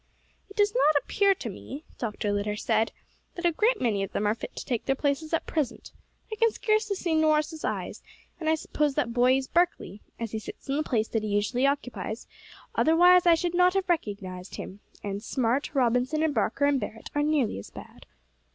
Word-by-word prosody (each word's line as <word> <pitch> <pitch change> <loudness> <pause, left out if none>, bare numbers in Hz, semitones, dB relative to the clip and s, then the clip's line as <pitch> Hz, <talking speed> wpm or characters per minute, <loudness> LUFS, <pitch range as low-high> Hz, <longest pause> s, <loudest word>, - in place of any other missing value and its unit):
"It 400 - -13
does 415 0 +3
not 310 -11 +4
appear 400 -1 +3
to 255 - -6
me," 265 - -8 0.2
Dr. 210 -3 -2
Litter 205 +1 -1
said, 220 +1 +1 0.4
"that 350 - -4
a 345 - +5
great 440 +9 +2
many 220 -5 +1
of 195 0 -4
them 210 - -1
are 210 - +3
fit 230 - -8
to - - -6
take 240 -3 -2
their 270 - +1
places 285 +3 -1
at 330 - 0
present. 305 -6 -3 0.4
I 435 - -4
can 460 +1 +4
scarcely 430 -1 0
see 350 -3 -1
Norris's 310 0 +2
eyes; - - -3 0.4
and 315 -2 -1
I 320 - +4
suppose 300 -2 -1
that 235 -1 0
boy 250 +2 +4
is 270 - -2
Barkley, 345 - 0 0.2
as 230 -2 -4
he 220 - -3
sits - - -10
in 275 - 0
the - - +1
place 225 -7 0
that 225 - 0
he 215 - -3
usually 210 +6 +1
occupies, 250 -5 -3 0.5
otherwise, 355 +2 +5
I 340 - +7
should 345 +1 -2
not 360 +1 +4
have 385 -1 0
recognised 200 - -3
him; 195 - -8 0.2
and 200 0 -4
Smart, 255 +5 -1
Robertson, 255 +4 +2
and 315 -2 +1
Barker 230 +4 +1
and 285 -1 +3
Barret 220 0 -7
are 290 - +1
nearly 295 - +1
as 100 - -10
bad. - - -13
275 Hz, 205 wpm, -27 LUFS, 220-330 Hz, 0.5 s, I